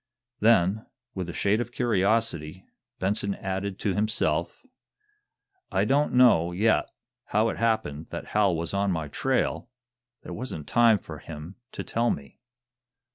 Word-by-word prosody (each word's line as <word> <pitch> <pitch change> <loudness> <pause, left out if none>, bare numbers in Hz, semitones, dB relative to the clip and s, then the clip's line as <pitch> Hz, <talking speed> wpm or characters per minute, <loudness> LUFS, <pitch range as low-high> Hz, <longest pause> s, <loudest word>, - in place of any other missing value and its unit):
Then, 105 -1 +3 0.3
with 90 -3 -4
a - - -5
shade 105 +5 +1
of 120 - -5
curiosity, 100 -7 0 0.3
Benson 100 +1 -1
added 95 0 -4
to 100 - 0
himself: 90 - 0 1.1
"I - - +2
don't 145 +2 +2
know, 115 -10 +5
yet, 105 +5 +2 0.4
how 110 +2 +2
it - - -4
happened 110 -10 -1
that - - -6
Hal 100 -4 +2
was 85 +2 -3
on 100 0 +1
my 80 -4 -3
trail. 130 - -1 0.5
There - - -7
wasn't 110 - -5
time 115 -2 +4
for 80 -5 -10
him 80 +4 -9 0.2
to - - -5
tell 120 +1 0
me." 70 -1 -5
100 Hz, 140 wpm, -26 LUFS, 85-115 Hz, 1.1 s, know